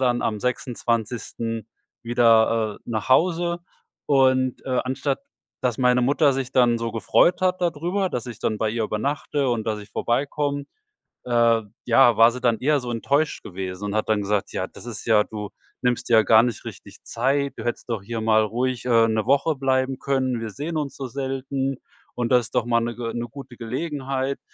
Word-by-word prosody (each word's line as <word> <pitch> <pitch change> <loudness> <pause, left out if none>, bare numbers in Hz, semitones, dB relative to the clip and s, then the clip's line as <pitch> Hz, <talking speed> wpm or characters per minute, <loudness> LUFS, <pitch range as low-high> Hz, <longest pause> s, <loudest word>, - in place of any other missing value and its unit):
dann 125 -2 +1
am 105 -2 -1
26. 115 -2 -2 0.4
wieder, 115 -2 +3
äh, - - -40
nach 115 -1 -3
Hause. 170 +4 +2 0.5
Und, 130 -2 +3
äh, 130 -1 +1
anstatt, 135 - -2 0.4
dass 125 -2 0
meine 125 -1 +3
Mutter 140 +2 +3
sich 135 -1 -3
dann 120 -2 +4
so 115 -1 -3
gefreut 145 +9 +3
hat 185 0 +1
dadrüber, 175 +3 0
dass 125 -1 -3
ich 120 -3 -8
dann 110 - -1
bei 110 - 0
ihr 115 0 -1
übernachte 140 +5 -1
und, 115 -3 -2
dass 110 -1 -1
ich 105 - -12
vorbeikomme, 140 +3 -1 0.6
äh, 115 -2 +3 0.2
ja, 120 -1 +5
war 115 +1 +7
sie 125 - -6
dann 120 -2 +2
eher 145 +2 +2
so 125 - -6
enttäuscht 140 +6 0
gewesen 95 0 -6
und 100 - -3
hat 110 - 0
dann 110 -1 +2
gesagt: 100 0 -1
„Ja, - - -1
das - - -13
ist 115 -5 -6
ja 110 -3 +4
du 105 -2 -6 0.3
nimmst 125 0 0
ja 110 -2 +6
gar 110 0 +6
nicht 120 -3 -2
richtig - - -10
Zeit. 135 +4 0
Du 115 - -7
hättest 120 - -3
doch 115 -4 -2
hier 115 +2 -4
mal 110 0 +4
ruhig, 125 +3 -2
äh, 115 -2 +4
ne 110 -1 0
Woche 140 +3 +2
bleiben 130 -1 0
können. 130 -3 0
Wir 115 - -4
sehen 155 +7 -4
uns 145 -3 -3
so 135 - -5
selten. 135 +1 -3 0.4
Und 120 0 -2
das 125 -2 +4
ist - - -14
doch - - +2
mal 115 -1 +2
ne 120 0 -3
Ge 115 -1 -4
ne 120 0 -3
gute 135 -2 -11
Gelegenheit.“ 135 +1 -3
125 Hz, 195 wpm, -23 LUFS, 115-135 Hz, 0.6 s, war